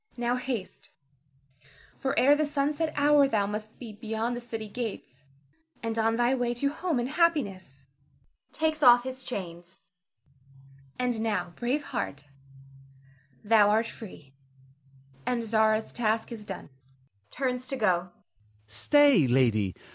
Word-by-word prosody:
Now 240 Hz, +1 st, 0 dB
haste; 250 Hz, -6 st, -5 dB, 1.1 s
for 270 Hz, +1 st, -2 dB
ere 285 Hz, +3 st, +6 dB
the 305 Hz, 0 st, 0 dB
sunset 295 Hz, +2 st, -1 dB
hour 290 Hz, -1 st, +5 dB
thou 210 Hz, -6 st, +1 dB
must 210 Hz, +1 st, -6 dB
be 230 Hz, -4 st, -9 dB
beyond 225 Hz, +2 st, -3 dB
the 240 Hz, -, -6 dB
city 225 Hz, -2 st, -6 dB
gates, 205 Hz, -, -7 dB, 0.6 s
and 225 Hz, -1 st, -2 dB
on 225 Hz, 0 st, +2 dB
thy 240 Hz, +2 st, +2 dB
way 245 Hz, -2 st, -1 dB
to 280 Hz, +4 st, 0 dB
home 335 Hz, -1 st, -2 dB
and 240 Hz, 0 st, -1 dB
happiness 205 Hz, -, -1 dB, 0.7 s
[takes 315 Hz, -1 st, -1 dB
off 245 Hz, -3 st, +7 dB
his 260 Hz, 0 st, -4 dB
chains]. 175 Hz, -4 st, -6 dB, 1.2 s
And 245 Hz, -3 st, -1 dB
now, 180 Hz, -6 st, -2 dB
brave 255 Hz, +5 st, -1 dB
heart, 145 Hz, -, -5 dB, 1.1 s
thou 210 Hz, -1 st, +5 dB
art 220 Hz, +2 st, +2 dB
free, 180 Hz, -12 st, -11 dB, 0.9 s
and 240 Hz, -, -1 dB
Zara's 220 Hz, 0 st, +1 dB
task 225 Hz, 0 st, -1 dB
is 215 Hz, -3 st, -8 dB
done -, -, -8 dB, 0.6 s
[turns 255 Hz, -1 st, -2 dB
to 270 Hz, -, -2 dB
go]. 210 Hz, -8 st, +3 dB
Ernest. 180 Hz, 0 st, -13 dB, 0.6 s
Stay, 225 Hz, -, +4 dB
lady! 115 Hz, -7 st, +2 dB
230 Hz, 130 wpm, -28 LUFS, 205-260 Hz, 1.2 s, off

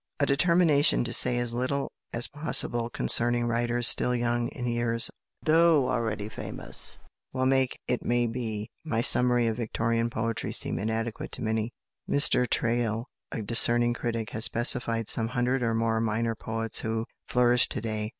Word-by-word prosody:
A 140 Hz, -, +2 dB
determination 150 Hz, 0 st, +2 dB
to 120 Hz, 0 st, -2 dB
say 120 Hz, -, +4 dB
as 120 Hz, -1 st, -1 dB
little 130 Hz, +3 st, -3 dB, 0.2 s
as 120 Hz, 0 st, -3 dB
possible 120 Hz, -6 st, +1 dB
concerning 120 Hz, 0 st, +2 dB
writers 120 Hz, +1 st, 0 dB
still 125 Hz, -, +3 dB
young 120 Hz, 0 st, -1 dB
in 125 Hz, -, -7 dB
years, 120 Hz, -1 st, -1 dB, 0.3 s
though 160 Hz, -3 st, +3 dB
already 110 Hz, -4 st, -3 dB
famous, 110 Hz, -, -8 dB, 0.4 s
will 130 Hz, 0 st, -1 dB
make, 130 Hz, -1 st, 0 dB
it 125 Hz, -, -2 dB
may 120 Hz, 0 st, 0 dB
be, 110 Hz, -3 st, -5 dB
my 115 Hz, -8 st, -2 dB
summary 125 Hz, 0 st, +4 dB
of 115 Hz, -1 st, -2 dB
Victorian 115 Hz, 0 st, -2 dB
poetry 115 Hz, -1 st, -4 dB
seem -, -, +1 dB
inadequate 110 Hz, +2 st, -4 dB
to -, -, -3 dB
many. 110 Hz, +1 st, -2 dB, 0.4 s
Mr 130 Hz, -3 st, +4 dB
Traill, 115 Hz, -1 st, -1 dB, 0.3 s
a 110 Hz, -, -5 dB
discerning 120 Hz, +2 st, +3 dB
critic, 115 Hz, -2 st, -5 dB
has 110 Hz, -, -1 dB
specified 115 Hz, -2 st, +2 dB
some 115 Hz, -1 st, +5 dB
hundred 125 Hz, +2 st, -1 dB
or 115 Hz, -1 st, -1 dB
more 115 Hz, 0 st, -1 dB
"minor 115 Hz, +1 st, -2 dB
poets" 115 Hz, 0 st, -1 dB
who 110 Hz, 0 st, -3 dB, 0.2 s
flourish 125 Hz, -1 st, +3 dB
to -, -, -3 dB
day! 110 Hz, -1 st, -4 dB
120 Hz, 160 wpm, -26 LUFS, 115-125 Hz, 0.4 s, some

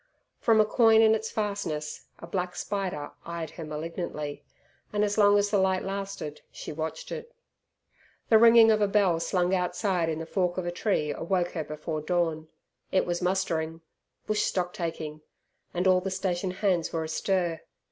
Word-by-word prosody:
From 225 Hz, -1 st, +4 dB
a 215 Hz, -, +6 dB
coign 225 Hz, 0 st, +5 dB
in 220 Hz, 0 st, +6 dB
its 220 Hz, 0 st, -1 dB
fastness 200 Hz, -8 st, -3 dB
a -, -, -9 dB
black 180 Hz, +1 st, -3 dB
spider 190 Hz, -7 st, -3 dB
eyed 170 Hz, -2 st, -5 dB
her 165 Hz, -, -8 dB
malignantly, 155 Hz, -1 st, -5 dB, 0.5 s
and 210 Hz, 0 st, +1 dB
as 205 Hz, -1 st, 0 dB
long 205 Hz, -1 st, +5 dB
as 205 Hz, 0 st, +1 dB
the 205 Hz, -, +3 dB
light 190 Hz, -1 st, +2 dB
lasted 195 Hz, -6 st, -5 dB
she -, -, -7 dB
watched 160 Hz, -, -5 dB
it. 475 Hz, +1 st, -7 dB, 0.9 s
The 220 Hz, -, +7 dB
ringing 230 Hz, -1 st, +8 dB
of 215 Hz, -1 st, +2 dB
a 205 Hz, -, +4 dB
bell 195 Hz, -5 st, +3 dB
slung 180 Hz, +1 st, +1 dB
outside 180 Hz, -1 st, 0 dB
in 160 Hz, -, -2 dB
the 165 Hz, -, -5 dB
fork 180 Hz, +1 st, -1 dB
of 185 Hz, -, -2 dB
a 175 Hz, -, -1 dB
tree 175 Hz, -5 st, 0 dB
awoke 175 Hz, +2 st, -1 dB
her 160 Hz, -, -3 dB
before 155 Hz, +1 st, -4 dB
dawn. 160 Hz, -1 st, -1 dB, 0.4 s
It 190 Hz, -, +2 dB
was 175 Hz, 0 st, -2 dB
mustering 165 Hz, -3 st, -1 dB, 0.4 s
bush 215 Hz, 0 st, 0 dB
stocktaking 165 Hz, -5 st, -3 dB, 0.5 s
and 180 Hz, +1 st, -1 dB
all 185 Hz, -1 st, +5 dB
the 195 Hz, -, -3 dB
stationhands 185 Hz, -1 st, -1 dB
were 165 Hz, -1 st, -1 dB
astir. 170 Hz, +1 st, -1 dB
180 Hz, 165 wpm, -28 LUFS, 165-205 Hz, 0.9 s, ringing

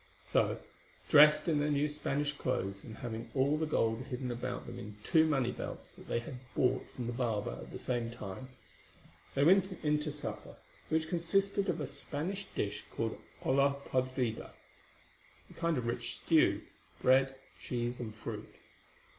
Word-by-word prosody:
So, -, -, +2 dB, 0.5 s
dressed 150 Hz, +3 st, +8 dB
in 155 Hz, -3 st, +3 dB
their 150 Hz, +1 st, +1 dB
new 145 Hz, 0 st, +2 dB
Spanish 145 Hz, -1 st, -1 dB
clothes, 100 Hz, -8 st, -2 dB
and 110 Hz, -2 st, -9 dB
having 115 Hz, -1 st, -5 dB
all 140 Hz, +2 st, +3 dB
the 155 Hz, 0 st, 0 dB
gold 115 Hz, -4 st, +1 dB
hidden 125 Hz, -2 st, -3 dB
about 120 Hz, 0 st, -4 dB
them -, -, -7 dB
in 105 Hz, 0 st, -8 dB
two 160 Hz, -2 st, +5 dB
money 135 Hz, -5 st, +2 dB
belts -, -, -6 dB
that -, -, -15 dB
they -, -, 0 dB
had 125 Hz, +2 st, -5 dB, 0.2 s
bought 125 Hz, -, +2 dB
from 125 Hz, -, -4 dB
the 120 Hz, -, -2 dB
barber 115 Hz, -, -1 dB
at -, -, -10 dB
the -, -, -5 dB
same 120 Hz, -2 st, -1 dB
time, 115 Hz, +2 st, -7 dB, 0.9 s
they 140 Hz, -, +3 dB
went 190 Hz, +4 st, +5 dB
in 150 Hz, 0 st, +3 dB
to 150 Hz, 0 st, -3 dB
supper, 150 Hz, 0 st, -5 dB, 0.3 s
which 160 Hz, 0 st, +1 dB
consisted 195 Hz, +4 st, +1 dB
of 170 Hz, -2 st, 0 dB
a 150 Hz, -, -1 dB
Spanish 165 Hz, +9 st, -1 dB
dish 105 Hz, 0 st, -1 dB
called 115 Hz, -1 st, -2 dB, 0.3 s
olla 140 Hz, +1 st, +4 dB
podrida—a 130 Hz, -3 st, 0 dB, 1.0 s
kind 165 Hz, -2 st, 0 dB
of 125 Hz, -, -2 dB
rich 120 Hz, +1 st, -1 dB
stew—bread, 135 Hz, -4 st, +2 dB, 0.3 s
cheese, 120 Hz, 0 st, -2 dB
and 110 Hz, -3 st, -5 dB
fruit. 110 Hz, -, -6 dB
135 Hz, 160 wpm, -33 LUFS, 120-150 Hz, 1.0 s, dressed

